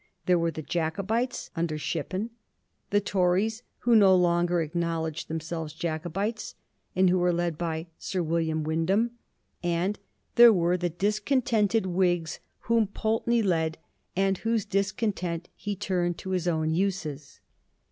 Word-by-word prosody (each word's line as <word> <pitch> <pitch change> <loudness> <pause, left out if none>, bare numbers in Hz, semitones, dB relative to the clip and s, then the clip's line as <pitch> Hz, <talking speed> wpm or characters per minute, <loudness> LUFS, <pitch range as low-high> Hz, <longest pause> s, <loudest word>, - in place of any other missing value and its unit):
There 180 -1 +4
were 170 0 +1
the 155 -1 -6
Jacobites, 200 - -2
under 165 -2 -1
Shippen; 195 +8 -3 0.6
the 205 - +3
Tories 200 +3 +1 0.2
who 240 -1 +4
no 195 -3 +7
longer 175 -2 +2
acknow 165 0 -1
ledged 160 0 -4
themselves 160 -1 -4
Jacobites, 175 +7 -3 0.4
and 185 +1 +4
who 180 +1 +3
were 175 0 +3
led 170 -1 0
by 160 0 -3
Sir 185 -2 -2
William 160 -1 0
Wyndham; 170 +9 +1 0.5
and 175 +4 0 0.4
there 235 -1 +10
were 175 -3 +2
the 175 -1 -1
discontented 215 - +1
Whigs 175 -3 0 0.2
whom 230 -2 +2
Pulteney 225 +3 0
led 160 -4 +1 0.4
and 195 0 +1
whose 225 -2 0
discontent 195 -4 -1
he 205 -1 -4
turned 175 -3 -1
to 190 - -6
his 180 -2 0
own 160 -2 +1
uses. 160 -6 -2
180 Hz, 135 wpm, -27 LUFS, 165-205 Hz, 0.6 s, there